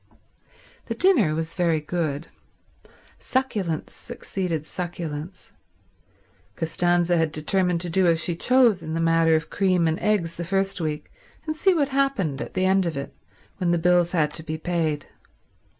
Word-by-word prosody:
The -, -, -3 dB
dinner 350 Hz, -, +4 dB
was 165 Hz, +1 st, -3 dB
very 170 Hz, -3 st, +1 dB
good. 155 Hz, -1 st, -3 dB, 0.9 s
Succulence 210 Hz, -, -2 dB
succeeded 170 Hz, -6 st, -4 dB
succulence. 170 Hz, 0 st, -6 dB, 1.0 s
Costanza 175 Hz, +1 st, +1 dB
had 160 Hz, -2 st, +1 dB
determined 175 Hz, +3 st, 0 dB
to 175 Hz, -, -4 dB
do 185 Hz, +1 st, +3 dB
as 165 Hz, -1 st, +3 dB
she 175 Hz, -, -1 dB
chose 240 Hz, 0 st, +4 dB
in 160 Hz, +1 st, -5 dB
the -, -, -1 dB
matter 165 Hz, -1 st, +3 dB
of 160 Hz, +1 st, -2 dB
cream 185 Hz, -4 st, +2 dB
and 160 Hz, 0 st, 0 dB
eggs 195 Hz, -6 st, 0 dB
the 170 Hz, -, -3 dB
first 195 Hz, +1 st, -1 dB
week, 150 Hz, -1 st, -4 dB, 0.3 s
and 310 Hz, -1 st, -2 dB
see 375 Hz, +4 st, +3 dB
what 290 Hz, -4 st, +1 dB
happened 265 Hz, -, 0 dB
at -, -, -7 dB
the 185 Hz, 0 st, +1 dB
end 190 Hz, -1 st, +3 dB
of 160 Hz, -, -3 dB
it 140 Hz, -, -5 dB, 0.4 s
when 180 Hz, -2 st, 0 dB
the 175 Hz, -, +3 dB
bills 175 Hz, 0 st, +3 dB
had 150 Hz, -3 st, +1 dB
to -, -, -2 dB
be 155 Hz, 0 st, -5 dB
paid. 160 Hz, -3 st, -1 dB
170 Hz, 160 wpm, -24 LUFS, 160-190 Hz, 1.0 s, dinner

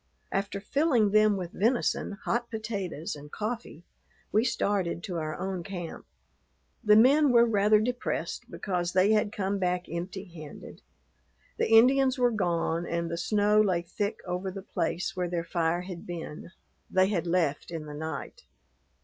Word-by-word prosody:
After 200 Hz, 0 st, -2 dB
filling 240 Hz, -1 st, +2 dB
them 215 Hz, -1 st, +4 dB
with 180 Hz, -2 st, -5 dB
venison, 230 Hz, 0 st, 0 dB
hot 235 Hz, 0 st, -1 dB
potatoes, 200 Hz, -9 st, -4 dB
and 145 Hz, 0 st, -11 dB
coffee, 215 Hz, -6 st, -5 dB, 0.5 s
we 215 Hz, -, +3 dB
started 200 Hz, -8 st, 0 dB
to 180 Hz, -3 st, -4 dB
our 155 Hz, -1 st, -3 dB
own 190 Hz, -1 st, -3 dB
camp. 175 Hz, -3 st, -7 dB, 0.8 s
The 210 Hz, -2 st, +6 dB
men 280 Hz, +7 st, +6 dB
were 235 Hz, -1 st, +6 dB
rather 210 Hz, -1 st, +4 dB
depressed 245 Hz, +3 st, -3 dB
because 180 Hz, -3 st, -2 dB
they 190 Hz, +3 st, +4 dB
had 210 Hz, -1 st, +2 dB
come 200 Hz, -1 st, -2 dB
back 180 Hz, -1 st, 0 dB
empty 180 Hz, +3 st, -5 dB
handed. 160 Hz, -5 st, -11 dB, 0.8 s
The -, -, +1 dB
Indians 260 Hz, +4 st, +6 dB
were 245 Hz, -1 st, +3 dB
gone 170 Hz, -4 st, 0 dB
and 170 Hz, 0 st, -2 dB
the -, -, -1 dB
snow 210 Hz, +3 st, +3 dB
lay 185 Hz, -5 st, +1 dB
thick 200 Hz, +4 st, -3 dB
over 180 Hz, +1 st, -3 dB
the 190 Hz, +1 st, -7 dB
place 195 Hz, -1 st, -2 dB
where 180 Hz, -1 st, -1 dB
their 170 Hz, -1 st, -1 dB
fire 170 Hz, 0 st, 0 dB
had 180 Hz, -2 st, -8 dB
been; 170 Hz, -3 st, -7 dB, 0.4 s
they 185 Hz, +1 st, +3 dB
had 180 Hz, -4 st, -1 dB
left 165 Hz, -5 st, 0 dB
in 165 Hz, -2 st, -5 dB
the 150 Hz, -, -8 dB
night. 160 Hz, -, -6 dB
195 Hz, 160 wpm, -28 LUFS, 170-215 Hz, 0.8 s, The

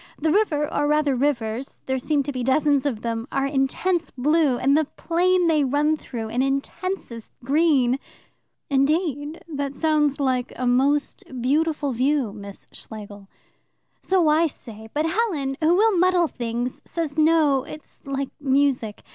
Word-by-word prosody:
The 315 Hz, +1 st, 0 dB
river, 310 Hz, -7 st, +2 dB
or 290 Hz, -, +1 dB
rather 300 Hz, -2 st, +2 dB
rivers 245 Hz, -2 st, -2 dB
there 265 Hz, 0 st, -1 dB
seem 285 Hz, +2 st, 0 dB
to 285 Hz, -, -4 dB
be 255 Hz, -2 st, -4 dB
dozens 285 Hz, +2 st, +2 dB
of 230 Hz, -6 st, -3 dB
them 230 Hz, 0 st, -3 dB
are 275 Hz, 0 st, 0 dB
intense 290 Hz, +5 st, 0 dB
blue, 290 Hz, 0 st, +2 dB
and 275 Hz, +3 st, +2 dB
the 310 Hz, 0 st, +3 dB
plain 355 Hz, +4 st, +1 dB
they 310 Hz, -3 st, +3 dB
run 290 Hz, +3 st, +2 dB
through 230 Hz, -7 st, -6 dB
an 240 Hz, +3 st, 0 dB
intensest 275 Hz, -, -3 dB
green." 275 Hz, -3 st, +3 dB, 0.7 s
"Indeed! 290 Hz, +2 st, 0 dB
That 285 Hz, -3 st, -4 dB
sounds 300 Hz, -3 st, +1 dB
like 255 Hz, -2 st, 0 dB
a 255 Hz, -, -3 dB
most 270 Hz, +4 st, +1 dB, 0.2 s
beautiful 295 Hz, +3 st, 0 dB
view, 260 Hz, -2 st, 0 dB
Miss 200 Hz, -2 st, -10 dB
Schlegel." 205 Hz, -2 st, -10 dB, 0.7 s
"So 370 Hz, -4 st, +2 dB
I 315 Hz, +2 st, +4 dB
say, 220 Hz, -6 st, -10 dB
but 300 Hz, +1 st, -1 dB
Helen, 325 Hz, -8 st, -1 dB
who 320 Hz, +3 st, +4 dB
will 430 Hz, +1 st, +3 dB
muddle 360 Hz, -1 st, +3 dB
things, 240 Hz, -1 st, -4 dB
says 320 Hz, -4 st, -4 dB
no, 310 Hz, -3 st, +3 dB
it's 300 Hz, -, -11 dB
like 275 Hz, -1 st, -2 dB
music. 270 Hz, -6 st, 0 dB
285 Hz, 150 wpm, -23 LUFS, 255-315 Hz, 0.7 s, I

